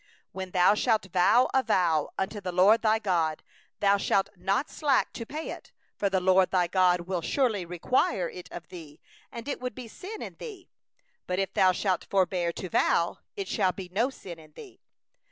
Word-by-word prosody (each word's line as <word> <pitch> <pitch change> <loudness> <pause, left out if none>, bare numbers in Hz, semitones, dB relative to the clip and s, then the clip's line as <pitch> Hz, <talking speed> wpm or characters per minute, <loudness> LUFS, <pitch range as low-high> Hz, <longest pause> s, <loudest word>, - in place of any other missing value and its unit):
22When 190 -1 -6
thou 180 +2 +5
shalt 220 -1 +1
vow 220 +7 +5
a 265 - +4
vow 165 - +1
unto 205 +2 -3
the 185 - -4
LORD 190 +6 +5
thy 220 -1 +3
God, 170 -7 -1 0.4
thou 200 0 +4
shalt 195 0 +1
not 195 +9 0
be - - -18
slack 285 -4 +1
to 230 - -7
pay 310 +2 -5
it; - - -10 0.2
for 200 - 0
the 190 -1 +1
LORD 185 0 +4
thy 180 -2 +2
God 180 0 +3
will 180 0 -3
surely 220 - 0
require 180 +1 0
it 180 +1 -10
of 175 0 -9
thee; 160 -5 -11 0.3
and 235 +1 -8
it 285 - -3
will 250 - -2
be 250 +1 -10
sin 395 - -8
in - - -9
thee. 400 -7 -10 0.6
23But 180 - -1
if 195 0 -1
thou 185 -1 +4
shalt 185 0 -1
forbear 185 -3 +1
to 185 - -6
vow, 170 0 +1 0.2
it 395 -3 -4
shall 190 -5 +1
be 185 -2 -8
no 225 +7 +1
sin 180 -10 -10
in 155 -1 -17
thee. 390 - -13
190 Hz, 200 wpm, -27 LUFS, 180-225 Hz, 0.6 s, thou